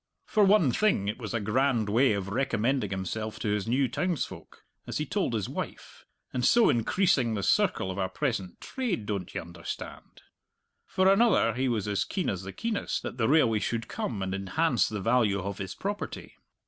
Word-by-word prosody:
For 210 - +3
one 195 -9 +5
thing, 190 - +1
it 105 - -3
was 115 -4 -5
a 115 - 0
grand 115 +1 +1
way 115 +3 +3
of 100 -1 -3
recommending 125 +2 0
himself 105 +3 -4
to 110 - -1
his 105 -1 -1
new 130 +3 +2
townsfolk, 140 - -4 0.2
as - - -3
he - - -1
told - - -1
his - - -1
wife, - - -7 0.3
"and 125 - -1
so 235 - +5
increasing 125 - +2
the 100 - -3
circle 95 - +2
of 95 - -5
our 95 -1 0
present 100 -5 -3
trade, 235 - -3
don't 100 -4 -3
ye - - 0
understand?" 85 0 -8 0.6
for 190 0 +2
another, 195 - +4
he 130 +2 0
was 110 -4 -1
as 100 -1 +1
keen 185 - -2
as 95 -2 -4
the 95 0 -7
keenest 225 - -2
that 125 - -6
the 110 - +2
railway 125 -8 +4
should 115 +1 -2
come 100 -5 -3
and 95 0 -3
enhance 105 - +1
the 105 -2 -4
value 115 -2 +2
of 100 0 -5
his 95 -2 -5
property. 205 +1 -5
115 Hz, 190 wpm, -28 LUFS, 100-140 Hz, 0.6 s, one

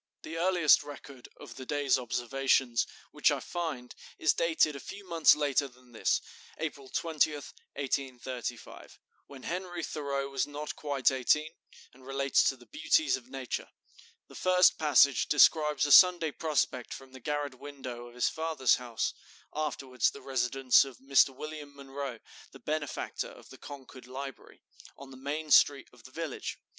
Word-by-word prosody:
The 160 - -7
earliest 175 -2 +4
record 140 -3 -11
of - - -11
the 130 - -8
day's 145 -3 +1
observations 125 0 +1 0.2
which - - +3
I - - 0
find 155 -8 -5 0.2
is 155 - +3
dated 160 -3 +2
a - - -6
few 200 +6 -10
months 165 -2 +5
later 145 -1 +1
than 125 -1 -21
this 115 - 0 0.4
(April 140 -4 -5
20, 160 0 +1
1835), 130 -4 -6 0.3
when 135 -2 -12
Henry 175 -1 -4
Thoreau 140 -3 -3
was 135 -1 -1
not 145 +1 -6
quite 140 -3 +1
eighteen, 150 +4 +1 0.4
and 130 +1 -19
relates 135 0 +2
to 135 - +1
the 120 - -17
beauties 310 +1 +2
of 130 -1 -11
nature. 130 -2 -5 0.6
The - - -16
first 185 -1 +4
passage 145 -3 +4
describes 150 -1 +4
a 145 - -1
Sunday 175 -2 +7
prospect 140 -5 -1
from 135 -1 -13
the 130 - -11
garret 145 -1 -3
window 130 -4 -8
of 120 - -15
his 125 - +1
father's 160 -5 +1
house, 120 -2 -3 0.4
(afterwards 135 -5 -1
the - - -11
residence 130 0 +3
of 135 -3 -10
Mr. 135 0 +4
William 150 +1 -8
Munroe, 140 -2 -6 0.4
the - - -12
benefactor 150 -2 -3
of - - -15
the - - -13
Concord 130 -3 -11
Library), 135 0 -9 0.3
on 135 -1 -12
the - - -11
main 150 +3 -4
street 140 -2 +5
of 120 -2 -19
the 130 - -13
village. 160 -2 -5
140 Hz, 155 wpm, -30 LUFS, 130-155 Hz, 0.6 s, Sunday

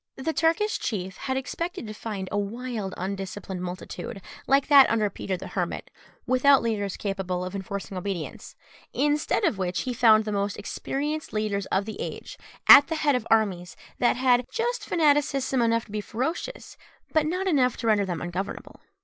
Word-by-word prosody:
The 305 +5 -2
Turkish 335 +7 +1
chief 190 -4 -3
had 265 -1 -2
expected 335 +3 -4
to 215 - -6
find 210 -3 -5
a 205 - 0
wild 220 -1 -4
undisciplined 190 0 -5
multitude, 185 +5 -6 0.3
like 275 0 +4
that 280 -2 +7
under 215 -3 +1
Peter 190 -2 -4
the - - -8
Hermit, - - -3 0.3
without 265 +1 +4
leaders 205 -4 -2
capable 190 -3 -3
of 185 - -6
enforcing 195 0 -5
obedience; 185 -3 -5 0.4
instead 295 +7 +1
of 285 - +1
which, 180 -1 -1
he 255 - -3
found 220 -2 +5
the 215 - -2
most 200 -1 -1
experienced 295 +8 -4
leaders 210 -2 -1
of 195 +1 0
the 220 - -6
age - - -7 0.3
at 285 - +10
the 325 - -2
head 300 -2 +2
of 250 -3 -1
armies 190 -6 +1 0.2
that 245 - +3
had 250 -1 +3
just 475 -1 -2
fanaticism 285 -5 +2
enough 230 0 +2
to - - -16
be 210 0 -2
ferocious, 270 - -4 0.4
but 310 -1 +3
not 365 +4 -1
enough 265 -9 +2
to - - -5
render 215 -2 +3
them 175 -4 -3
ungovernable. 175 +3 -5
225 Hz, 175 wpm, -26 LUFS, 195-280 Hz, 0.4 s, at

